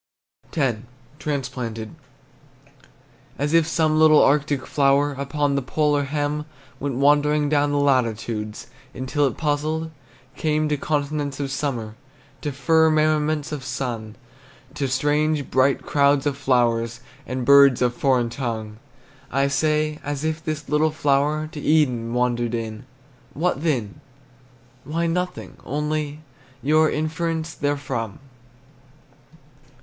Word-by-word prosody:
X. 130 -7 +1 0.4
TRANSPLANTED. 125 -6 -4 1.4
As 145 +2 -1
if 165 -2 +4
some 155 -1 +2
little 155 -1 +7
Arctic 145 -1 +2
flower, 140 0 +2
Upon 140 +1 -1
the 140 - +1
polar 145 +2 +1
hem, 150 +1 -2 0.3
Went 140 -2 -3
wandering 145 +2 +3
down 145 -1 +2
the 145 - +1
latitudes, 115 -6 0 0.3
Until 135 +3 0
it - - -4
puzzled 155 +1 -1 0.4
came 155 0 0
To 150 - +1
continents 145 -1 -2
of 140 -1 -3
summer, 125 -7 -3 0.5
To 145 - -2
firmaments 155 0 +2
of 145 -3 -4
sun, 115 -5 -4 0.6
To 145 -2 -2
strange, 150 +3 0
bright 130 +1 +2
crowds 140 -1 +2
of 145 -2 0
flowers, 120 -4 +1 0.3
And 130 -1 -3
birds 140 -1 +7
of 125 -1 +2
foreign 125 -2 +1
tongue! 110 -4 -4 0.5
I 135 +1 +2
say, 155 +1 0
as 145 0 -4
if 160 0 -2
this 155 -1 -4
little 150 +1 +2
flower 150 0 +1
To 150 - -7
Eden 125 -7 +1
wandered 120 -1 0
in 115 +1 -5 0.5
What 160 -1 0
then? 125 -11 -2 0.8
Why, 165 +5 -2
nothing, 180 +2 -3
only, 150 +1 -3 0.4
Your 155 +2 +4
inference 160 +1 -2
therefrom! 135 -7 -3
145 Hz, 120 wpm, -23 LUFS, 130-155 Hz, 1.4 s, little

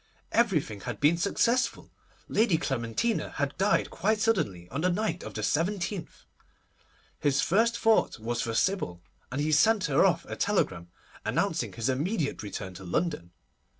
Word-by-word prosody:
Everything 165 - +1
had 120 -2 -5
been 150 +4 +4
successful. 230 +8 0 0.4
Lady 215 -6 +3
Clementina 135 - -1
had 140 0 -1
died 195 +2 +2
quite 210 +5 0
suddenly 165 - 0
on 140 +5 -2
the 180 - +2
night 180 -1 -1
of - - -8
the - - -3
17th! 180 +3 -2 0.9
His 140 -2 +2
first 225 +9 +2
thought 225 -10 +3
was 120 +1 -2
for 115 -1 -2
Sybil, 100 - 0 0.3
and 130 - -3
he 150 +1 0
sent 200 +7 +4
her 140 -3 +3
off - - +2
a - - -6
telegram 85 -2 0 0.3
announcing - - 0
his 115 0 -2
immediate 145 +5 -1
return 100 -2 -6
to 90 - -10
London. 95 - -2
155 Hz, 150 wpm, -28 LUFS, -, 0.9 s, been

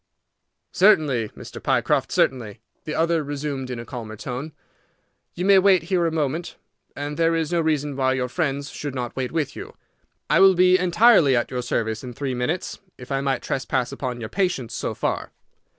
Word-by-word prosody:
"Certainly, 145 - +3
Mr. - - -9
Pycroft, - - +1
certainly," 115 -4 0 0.3
the 155 - -4
other 165 -1 +1
resumed 140 -2 -4
in 125 - -4
a 115 - -7
calmer 115 -3 -7
tone. 125 +7 -6 0.8
"You 180 - -2
may 195 -1 +7
wait 190 -3 +4
here 175 -2 +3
a - - -1
moment; 160 +1 -2 0.4
and 145 +1 -5
there 165 0 +2
is 160 -1 -1
no 170 -1 +2
reason 150 -3 0
why 130 -1 +1
your 130 -1 -1
friends 140 -1 -2
should 145 -2 -6
not 125 -2 -4
wait 130 -2 -3
with 160 -4 -2
you. - - -9 0.5
I - - +3
will 190 0 +7
be 185 +1 +5
entirely 180 - +5
at 120 - 0
your 125 -1 -2
service 110 -2 -2
in 125 -1 -7
three 135 +1 -3
minutes, 125 +9 -3 0.2
if 125 +1 -11
I 135 0 0
might 135 -2 -1
trespass 130 -1 -1
upon 130 -3 -4
your 110 -2 -6
patience 180 - -1
so - - -3
far." - - -3
140 Hz, 185 wpm, -23 LUFS, 125-165 Hz, 0.8 s, may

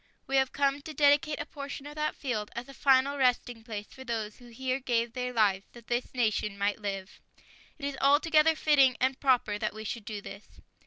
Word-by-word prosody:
We 270 - 0
have 265 -1 +2
come 280 0 +1
to 310 +1 -9
dedicate 295 +1 +3
a 290 - -3
portion 280 -1 -7
of 295 - -8
that 305 0 -2
field 220 -6 -3
as 240 +2 -5
a 275 - -11
final 275 +1 +3
resting 245 -2 +1
place 210 -2 -6
for 260 - -12
those 225 -4 -4
who 245 - -15
here 255 +2 -2
gave 235 -3 0
their 250 0 -3
lives 205 -5 +2
that 240 -1 -14
this 245 +2 -2
nation 215 -4 0
might 200 +1 -1
live. 195 -2 -5 0.6
It 285 - -6
is 280 -1 -3
altogether 305 +3 +4
fitting 275 -5 +4
and 260 +1 +1
proper 245 -6 +2
that - - -2
we 215 - -7
should 220 0 -5
do 210 -1 -5
this. 200 +1 -12
255 Hz, 210 wpm, -29 LUFS, 220-280 Hz, 0.6 s, altogether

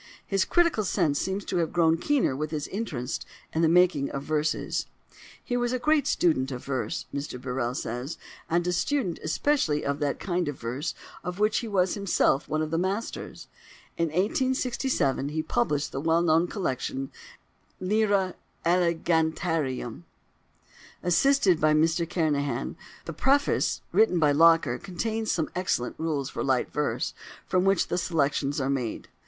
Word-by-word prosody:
His 195 -1 +1
critical 340 -11 +2
sense 150 -6 +1
seems 190 +1 -2
to 185 - -2
have 165 -2 0
grown 165 -2 +3
keener 275 - +1
with 150 +2 -3
his 150 -2 -3
interest 150 - -3 0.3
in 160 - +1
the 165 - +5
making 175 -5 +4
of 140 - -4
verses: 155 0 -1 0.6
"he 245 - -2
was 240 0 0
a - - +1
great 305 +3 +2
student 140 -6 +2
of 125 -1 -6
verse," 140 +1 -2
Mr 140 -3 -4
Birrell 125 -1 -2
says, 125 +5 -4 0.3
and 170 +1 +1
a 180 - 0
student 185 - 0
especially 155 - +1
of 140 +1 -1
that 145 -2 -1
kind 180 -3 -1
of 145 -2 -4
verse 130 +7 -3 0.3
of 180 0 -4
which 210 +1 +2
he 235 - -5
was 190 -3 +1
himself 195 -8 +1
one 155 0 0
of 155 - -4
the 165 - +1
masters. 195 +5 -3 0.5
In 170 - +1
1867 235 - 0
he 155 +1 -2
published 145 +3 0
the 135 - -3
well 165 +2 +2
known 165 +1 +3
collection 135 - -3 0.7
"Lyra 200 -1 +1 0.3
Elegantiarum," 160 - 0 1.0
assisted 185 - +3
by 155 0 +4
Mr 165 +2 +2
Kernahan: 145 -7 -1 0.3
the 165 - -5
preface, 275 - +2
written 220 -5 +4
by 150 -3 +4
Locker, 160 -5 +4
contains 220 +4 -2
some 160 -3 -1
excellent 180 -9 -1
rules 155 -4 -1
for - - -3
"light 130 -2 0
verse," 150 0 -1 0.3
from 185 0 +1
which 195 -2 +2
the - - 0
selections 145 -3 0
are 130 - 0
made. 130 -5 -2
165 Hz, 155 wpm, -27 LUFS, 145-190 Hz, 1.0 s, the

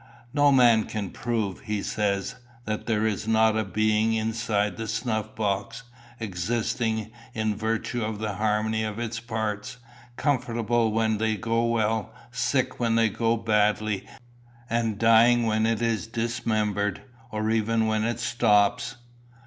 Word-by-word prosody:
"No 145 0 +4
man 120 -5 +5
can 100 -5 -4
prove," 110 -4 -2
he 105 -2 -3
said, 100 -2 -1 0.3
"that 110 0 -3
there 110 -1 +1
is 110 0 -1
not 110 0 +4
a 110 - +1
being 110 +3 +1
inside 110 -2 0
the 110 0 -5
snuff 110 -1 -2
box, 110 +3 -2 0.4
existing 110 +2 -2 0.2
in 110 -1 0
virtue 115 +2 -2
of 110 0 -3
the 105 -1 -3
harmony 110 +2 0
of 110 -1 -4
its 115 -1 -3
parts, 110 -1 -4 0.4
comfortable 120 -5 +1
when 110 -1 +1
they 110 -1 0
go 115 0 0
well, 110 -1 0 0.2
sick 125 +1 0
when 115 -2 +1
they 115 -1 +4
go 115 +2 0
badly, 105 -2 +1 0.6
and 115 -2 0
dying 115 +2 +5
when 110 0 +2
it 115 0 0
is 115 -2 0
dismembered, 110 -4 -1 0.3
or 110 0 -1
even 115 0 +1
when 110 0 +1
it 115 0 -1
stops." 105 -4 +2
110 Hz, 140 wpm, -26 LUFS, 105-115 Hz, 0.6 s, man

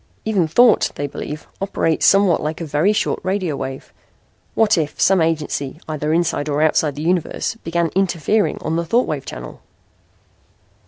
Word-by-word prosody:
Even 200 -7 +1
thought, 230 +8 +4
they 145 - -3
believe, 150 +2 -6 0.2
operates 180 -5 +1
somewhat 195 -3 +4
like 155 +1 -3
a 170 - -4
very 155 +6 +2
short 210 - 0
radio 185 -5 -1
wave. 135 -1 -7 0.6
What 220 -1 +4
if 155 -4 -2
some 190 -2 +4
agency, 155 -3 -2
either 155 -1 -2
inside 165 -3 0
or 150 +1 +1
outside 155 -2 +2
the 150 - -5
universe, 175 +3 -1
began 170 0 0
interfering 195 +2 +1
on 160 +1 -1
the 170 - 0
thought 235 +9 +2
wave 145 -3 -4
channel?" - - -8
165 Hz, 160 wpm, -20 LUFS, 150-190 Hz, 0.6 s, thought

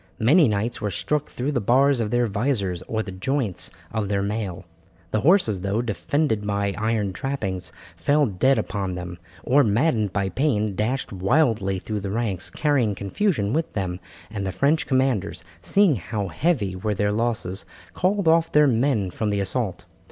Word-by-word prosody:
Many 145 +8 +5
knights 110 +2 -1
were 105 - -1
struck 150 +10 -2
through 130 +4 -2
the 125 -5 0
bars 130 +5 +3
of 110 -2 -1
their 120 +1 +2
vizors 100 -5 -1
or 110 -1 -1
the 95 - -7
joints 95 -3 -1 0.2
of 105 -2 -2
their 100 -1 0
mail. 100 -3 -3 0.5
The 110 - +1
horses, 145 - +3
though 100 +5 -1
defended 110 - -1
by 100 -1 0
iron 110 -2 -1
trappings, 95 -8 -3 0.2
fell 145 +1 +2
dead 130 +5 +2 0.2
under 95 -3 -2
them, 90 0 -7 0.2
or, 140 +3 +4
maddened 110 - +1
by 100 -1 -1
pain, 110 - 0
dashed 110 +4 -2
wildly 100 -1 +1
through 105 +3 -4
the 100 0 -4
ranks, 100 -4 -2
carrying 130 -9 +1
confusion 105 - 0
with 160 +1 -1
them, 95 -3 -3 0.3
and 100 -2 -4
the 95 - -2
French 145 - +1
commanders, 105 - 0 0.2
seeing 190 - +3
how 100 +1 -4
heavy 105 - 0
were 105 +3 -2
their 105 +1 +1
losses, 110 -4 -1 0.3
called 190 0 0
off 165 0 +4
their 150 0 +5
men 120 -6 +1
from 110 +4 -2
the 100 -1 0
assault. 100 -2 -2
110 Hz, 170 wpm, -24 LUFS, 100-135 Hz, 0.5 s, Many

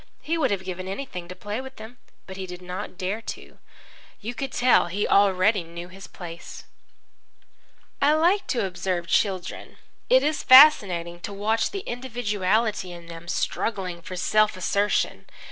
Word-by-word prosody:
He 325 - -1
would 305 -6 +1
have 195 -3 -1
given 185 0 -6
anything 190 -4 -6
to 180 - -8
play 210 +5 -5
with 265 0 -10
them. 220 +3 -11 0.3
But 190 - -9
he 190 -1 -6
did 180 0 -8
not 180 +1 -6
dare 195 +4 -3
to. - - -9 0.6
You 230 +4 -5
could 270 +2 -4
tell 245 -5 +4
he 195 +4 -1
already 200 0 +3
knew 170 +1 -9
his 195 +1 -11
place. 170 -2 -9 1.4
I 290 +2 +5
like 350 +6 +2
to 235 -6 0
observe 180 -1 -2
children. 185 0 -1 0.3
It - - +5
is 305 +1 0
fascinating 190 - +6
to 205 - -6
watch 215 +3 0
the 395 -1 -6
individuality 220 -5 -1
in 170 -1 -10
them 165 0 -10
struggling 185 -2 -2
for 185 - -8
self 210 +2 +2
assertion. 200 +3 0
200 Hz, 160 wpm, -25 LUFS, 180-240 Hz, 1.4 s, fascinating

